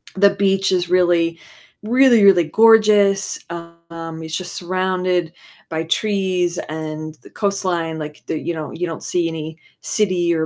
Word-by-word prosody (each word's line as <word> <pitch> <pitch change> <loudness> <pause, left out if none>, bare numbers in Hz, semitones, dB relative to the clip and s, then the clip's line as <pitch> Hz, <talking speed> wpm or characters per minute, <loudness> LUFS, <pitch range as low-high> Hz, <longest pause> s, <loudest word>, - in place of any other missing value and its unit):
the 200 +1 +5
beach 195 -1 +1
is 180 -1 0
really, 175 -2 +2 0.5
really, 240 -1 +4
really 180 -4 +6
gorgeous, 210 0 +4
um, 170 -1 -9
it's 160 0 -4
just 185 -1 -7
surrounded 185 -1 -1 0.4
by 160 -1 -2
trees 185 -1 0
and 155 0 -6
the - - -14
coastline, 180 -6 -2
like 150 0 -8
the 155 - -2
you 170 - -3
know, 155 -2 -6
you 175 +1 -3
don't 165 - -7
see 175 -2 0
any 160 -1 -6 0.2
city 180 -5 0
or 160 -1 0
175 Hz, 150 wpm, -19 LUFS, 165-195 Hz, 0.5 s, really